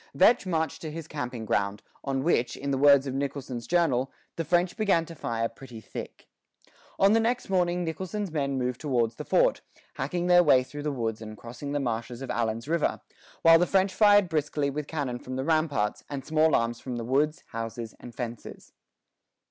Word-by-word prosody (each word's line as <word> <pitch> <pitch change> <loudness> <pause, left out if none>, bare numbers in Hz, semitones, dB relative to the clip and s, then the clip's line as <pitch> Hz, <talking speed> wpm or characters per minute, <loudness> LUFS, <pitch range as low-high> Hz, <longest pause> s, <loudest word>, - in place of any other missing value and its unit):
Vetch 235 -5 +5
marched 160 -3 -1
to 160 - -5
his 160 0 -7
camping 125 -7 -5
ground, 100 -1 -1 0.2
on 135 -1 -1
which, 125 -7 +1
in 140 0 -3
the 135 - +1
words 140 -1 +6
of 135 - -3
Nicholson's 135 -3 -4
journal, 140 -7 +2 0.2
"the 165 - -2
French 175 +2 +1
began 195 -6 +2
to 165 - -10
fire 115 -6 -2
pretty 120 0 -11
thick." 110 - -9 0.7
On 195 +2 +5
the 225 - +5
next 235 -2 -1
morning 180 -1 +1
Nicholson's 185 +4 -4
men 140 -3 -1
moved 125 -1 -2
towards 120 -6 0
the - - -5
fort, - - +2 0.4
hacking 175 +7 -2
their 175 0 +6
way 135 -6 +5
through 145 +3 -8
the 150 0 -1
woods 115 -4 -3
and 110 -1 -8
crossing 120 +6 -7
the 145 - 0
marshes 120 0 -3
of 135 - -4
Allen's 115 +1 -2
River, 165 0 0 0.4
while 165 0 +8
the 175 - +2
French 190 0 +2
fired 205 -2 +5
briskly 150 -3 -1
with 150 +1 -4
cannon 135 -6 -3
from 130 +1 -7
the 130 +1 -2
ramparts, 155 -10 0
and 140 -2 -5
small 155 0 +3
arms 115 0 0
from 125 -2 -5
the 115 -1 -4
woods, 145 +5 +1
houses, 115 0 -5
and 120 -2 -11
fences. 120 -3 -7
140 Hz, 195 wpm, -27 LUFS, 120-165 Hz, 0.7 s, while